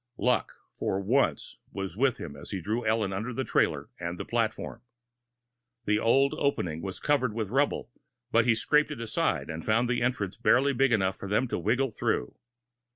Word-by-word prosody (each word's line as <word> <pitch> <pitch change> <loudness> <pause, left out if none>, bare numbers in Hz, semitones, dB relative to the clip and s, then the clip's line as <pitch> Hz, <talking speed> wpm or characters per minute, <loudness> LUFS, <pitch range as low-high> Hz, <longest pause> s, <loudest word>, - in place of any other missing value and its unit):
Luck, 125 -1 +1 0.2
for 95 - -1
once 120 +8 0
was 95 -3 -5
with 130 +2 +2
him 70 -4 -7
as 70 - -10
he 95 - -3
drew 110 +7 -2
Ellen 110 -3 +1
under 110 +6 -3
the 130 +2 -2
trailer - - 0
and 85 0 -4
the - - -5
platform. 115 -2 -2 1.0
The 105 0 +2
old 135 +5 +3
opening 90 - 0
was 95 0 -5
covered 130 -6 +1
with 110 -3 -3
rubble, 140 -1 0 0.4
but 115 -1 +4
he 120 -2 +4
scraped 150 +7 +2
it 150 -5 -6
aside, 115 -7 -1
and 80 +1 -6
found 115 +3 +2
an 120 - 0
entrance 120 -6 -1
barely 140 +2 +3
big 135 0 +3
enough 95 -4 +1
for 100 - -7
them 105 +6 +2
to - - -1
wiggle 120 +8 +1
through. 60 - -1
115 Hz, 185 wpm, -28 LUFS, 95-130 Hz, 1.0 s, but